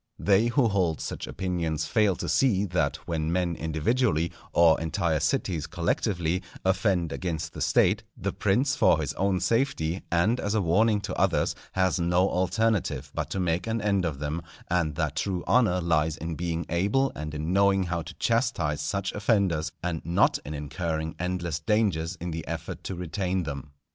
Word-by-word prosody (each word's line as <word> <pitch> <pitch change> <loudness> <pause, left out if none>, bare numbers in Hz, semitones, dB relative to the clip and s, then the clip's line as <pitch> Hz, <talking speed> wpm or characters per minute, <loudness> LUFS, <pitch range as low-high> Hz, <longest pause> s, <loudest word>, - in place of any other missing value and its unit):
They 105 +3 +3
who 120 +1 +3
hold 90 -7 +1
such - - -5
opinions 85 -4 -2
fail 105 +2 +2
to 85 - -5
see 100 - +3
that 85 -6 0
when 80 -1 -1
men 85 -1 0
individually, 80 - 0 0.2
or 85 -2 +5
entire 80 -1 0
cities 80 0 -1
collectively, 85 0 -1 0.2
offend 95 -3 +1
against 85 -4 -3
the - - -7
State, 100 +4 +3 0.2
the 100 +1 -3
prince 130 +8 +1
for 80 - +4
his 75 - -2
own 95 -1 +1
safety, 95 - 0
and 100 +9 +2
as 105 +1 -1
a 110 - +2
warning 105 +5 +3
to 100 -2 -4
others, - - +2 0.2
has 95 0 +1
no 90 +2 +3
alternative 105 +3 0
but - - -3
to 95 - -3
make 90 +2 0
an 115 0 0
end 100 -3 +1
of 80 -5 -2
them; 75 +4 -3 0.3
and 85 -4 +1
that 75 -2 -2
true 90 +1 -1
honour 110 -8 +3
lies 80 -2 +1
in 80 +1 -4
being 85 0 -2
able 100 +11 +1
and 75 0 -5
in 80 +4 -2
knowing 100 0 +4
how 85 -1 -2
to 80 - -9
chastise 75 -1 0
such 100 -1 -2
offenders, 100 -7 +1
and 85 -3 -2
not 85 +2 +2
in 75 +2 -6
incurring 80 +2 -3
endless 90 -3 -2
dangers 90 -3 +1
in 85 0 -5
the 80 0 -5
effort - - -5
to 95 - -4
retain 90 +1 -2
them. 70 -2 -6
90 Hz, 175 wpm, -27 LUFS, 80-100 Hz, 0.3 s, or